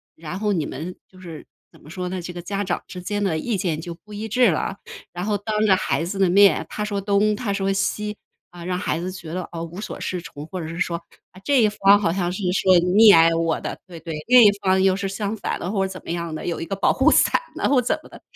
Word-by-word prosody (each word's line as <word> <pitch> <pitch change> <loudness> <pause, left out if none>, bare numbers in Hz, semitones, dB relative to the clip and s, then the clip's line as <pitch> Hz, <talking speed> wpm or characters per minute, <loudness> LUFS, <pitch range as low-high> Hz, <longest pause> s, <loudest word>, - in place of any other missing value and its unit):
然 170 +4 -7
后 210 -1 0
你 160 -5 -1
们 170 +7 -6
就 185 - -18
是 165 -4 -10 0.3
怎 - - -19
么 150 - -15
说 180 +1 -5
呢， 185 -1 -4
这 175 - -6
个 175 - -7
家 200 +3 -3
长 180 -2 -2
之 180 - -8
间 205 +3 -3
的 175 -5 0
意 215 +6 -2
见 170 -4 -1
就 170 +1 -6
不 210 +5 -16
一 215 +2 -5
致 245 0 +4
了。 190 +5 -2 0.3
然 180 +2 -5
后 210 -1 0
当 215 +1 -1
着 195 -3 +5
孩 165 -2 -1
子 195 +3 -4
的 190 -2 +3
面， 200 +2 +5
他 210 - -3
说 205 -1 -3
东 205 +1 +2
她 210 -2 -3
说 195 0 0
西， 210 +2 -2 0.4
啊， 175 -1 -11
让 180 0 -2
孩 165 - -1
子 185 +2 -4
觉 170 -3 -9
得， 180 -1 -4
哦， 165 -1 -5
无 175 +4 -9
所 - - -6
适 180 -1 -3
从， 150 -2 -10
或 185 -1 -6
者 160 - -5
是 165 - -7
说 170 -1 -1 0.4
这 275 -1 +3
一 215 - +5
方 200 -1 +4
好 165 - +1
像 180 -2 -1
是 190 +3 -5
说 185 -2 +4
溺 200 +5 +6
爱 165 0 +5
我 165 -1 0
的 - - -5
对 170 -3 -10
对， 155 -3 -6
另 250 -1 +8
一 205 - +7
方 190 -1 +2
又 190 -1 +3
是 195 0 -3
相 205 +2 -3
反 205 - -4
的 180 - -4
或 195 -2 0
者 190 - -5
怎 185 - -9
么 - - -5
样 170 -2 -3
的， - - -6
有 170 - -3
一 - - -3
个 195 - -5
保 195 - +2
护 - - +4
伞 - - +4 0.2
了 - - 0
或 270 -3 +4
者 - - -11
怎 - - +1
么 - - -15
的。 - - -14
185 Hz, 300 characters per minute, -22 LUFS, 170-205 Hz, 0.4 s, 另